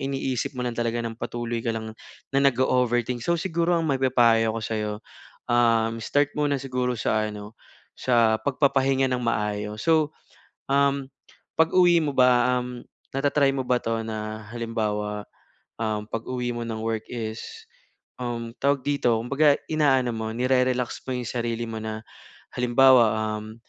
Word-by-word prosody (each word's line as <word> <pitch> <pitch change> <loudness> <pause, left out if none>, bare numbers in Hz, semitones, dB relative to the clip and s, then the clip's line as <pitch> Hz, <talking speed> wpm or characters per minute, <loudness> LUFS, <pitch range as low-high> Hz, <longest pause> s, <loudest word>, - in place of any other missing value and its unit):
iniisip 135 -1 -2
mo 125 - -1
lang 120 - -2
talaga 120 0 -1
ng 115 - -3
patuloy 120 0 -4
ka 115 - -2
lang 110 0 -6 0.4
na 135 - +3
nag-o-over 125 -2 +2
think. 125 0 -4
So, 170 +9 +1
siguro 170 0 0
ang 165 - 0
maipapayo 120 -5 +3
ako 115 - -3
sa 110 - -3
iyo, 105 0 -2 0.6
um, 115 -1 +3
start 145 +5 +1
muna 145 -1 +1
siguro 125 -2 -2
sa 110 -1 0
ano, 105 0 -8 0.4
sa 115 -3 +2
pagpapahinga 135 -1 +2
ng 125 - +1
maayos. 105 -2 -2
So, 155 -2 +2 0.5
um, 140 -1 +2 0.5
pag-uwi 175 +1 +5
mo 145 - -1
ba, 125 0 +4
um, 125 -1 -7 0.3
na-tra-try 140 0 +2
mo 130 - -2
ba 125 -1 +2
ito 115 0 -1
na 110 0 -5
halimbawa, 105 -3 -2 0.6
um, 105 -1 -1
pag-uwi 120 +2 -3
mo 120 - -5
ng 110 -1 -4
work 110 -1 -2
is, 120 - -6 0.6
um, 115 -1 -4
tawag 140 -1 +2
dito 140 -5 +2
kumbaga 140 +4 +3 0.2
inaano 135 -5 +3
mo 110 0 -3
nire-relax 125 0 0
mo 130 - -2
yung 125 - -4
sarili 120 -1 -2
mo 110 -1 -5
na 110 0 -5 0.5
halimbawa, 125 -2 +5 0.2
um, 110 +1 -9
125 Hz, 150 wpm, -25 LUFS, 115-135 Hz, 0.6 s, pag-uwi